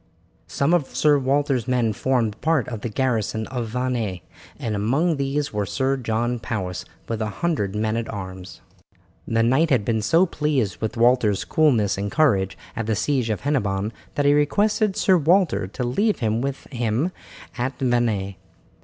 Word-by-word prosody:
Some 140 +5 +1
of 160 -6 0
Sir 150 -2 +4
Walter's 135 -2 0
men 120 -4 +1
formed 115 -3 0
part 155 -6 +1
of 115 -4 -6
the 120 - -3
garrison 110 -2 -1
of 120 -2 -3
Vannes, 115 -6 -2 0.4
and 110 -2 -3
among 140 - +1
these 140 +1 -1
was 105 -2 -2
Sir 135 0 0
John 120 -1 -1
Powis 90 -6 -4 0.2
with 115 -1 -3
a 110 - 0
hundred 105 - -2
men 110 +1 0
at 115 0 -3
arms. 95 - -8 0.7
The 115 0 +2
knight 135 +8 +3
had 125 -8 +2
been 110 -2 0
so 165 - +4
pleased 145 - -1
with 110 +2 -4
Walter's 120 -4 +3
coolness 110 -11 +2
and 100 0 -3
courage 100 - +2 0.2
at 115 -2 -3
the 110 - +1
siege 130 +1 0
at 105 - -2
Hennebon 105 -8 0 0.2
that 145 - 0
he 145 - +5
requested 200 +7 +2
Sir 190 -4 +4
Walter 170 - +2
to 115 +6 -5
leave 200 - +1
him 110 -1 0
with 140 +1 -3
him 120 +6 0 0.5
at 130 +2 -2
Vannes. 120 -6 0
120 Hz, 170 wpm, -23 LUFS, 110-140 Hz, 0.7 s, he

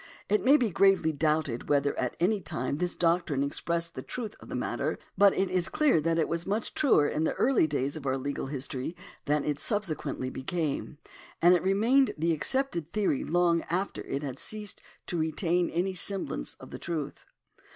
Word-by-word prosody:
It 210 +1 +2
may 275 +4 +7
be 235 -7 0
gravely 195 -3 +4
doubted 150 -4 -1
whether 145 -1 +2
at 125 - -2
any 200 +4 +2
time 130 -3 -3
this 175 +2 -2
doctrine 165 -5 +1
expressed 170 +4 -1
the 130 - -6
truth 225 - -5
of - - -13
the - - -4
matter, - - -2 0.2
but 200 0 +6
it 190 -1 +1
is 185 -1 +1
clear 290 - +3
that 165 +1 +1
it 160 - +2
was 170 0 -3
much 210 +3 -2
truer 200 - +4
in 150 +2 -1
the - - +1
early 245 -10 +3
days 140 -1 -1
of 145 -3 -6
our 135 0 +1
legal 140 0 -3
history, 135 +2 -3 0.3
than 150 0 +1
it 150 -1 -1
sub 210 -2 0
sequently 150 -7 -4
became; 150 +1 -3 0.4
and 175 +2 +6
it 175 - +3
remained 225 +9 +3
the 165 +2 +1
accepted 170 - 0
theory 200 -10 0
long 170 0 +2
after 185 +4 -2
it 140 - -3
had 135 -2 -5
ceased 210 -3 -4 0.2
to 175 - -3
retain 170 +2 +1
any 185 +3 -1
semblance 185 - -2
of - - -13
the - - -7
truth. 160 -4 -5
170 Hz, 195 wpm, -29 LUFS, 145-195 Hz, 0.4 s, may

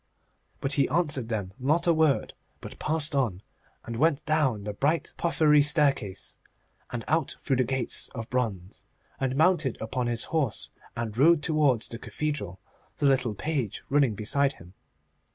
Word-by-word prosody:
But 135 - -1
he 140 -2 +2
answered 145 -6 0
them 100 -5 -3
not 155 +6 +1
a 170 - +4
word, 155 -3 +2 0.3
but - - -10
passed 155 -1 0
on, 115 -9 0 0.4
and 115 0 -5
went 155 +2 +2
down 145 -9 +1
the 105 0 -4
bright 150 +10 0
porphyry 155 -3 +3
staircase, 145 - +1 0.5
and 120 -2 -5
out 160 -2 0
through 135 -3 0
the 130 - +3
gates 130 0 -1
of 115 -2 -5
bronze, 105 -8 -3 0.4
and 130 -1 -1
mounted 155 -4 +2
upon 120 +2 -2
his 120 -1 0
horse, 145 -9 -1 0.3
and 115 -3 -3
rode 150 +4 +4
towards 145 -8 +2
the 115 - -7
cathedral, 130 -15 -4 0.4
the - - -1
little 130 -5 +2
page 135 -5 -3
running 140 -6 +3
beside 140 +7 +1
him. 90 -3 -16
135 Hz, 155 wpm, -27 LUFS, 115-150 Hz, 0.5 s, a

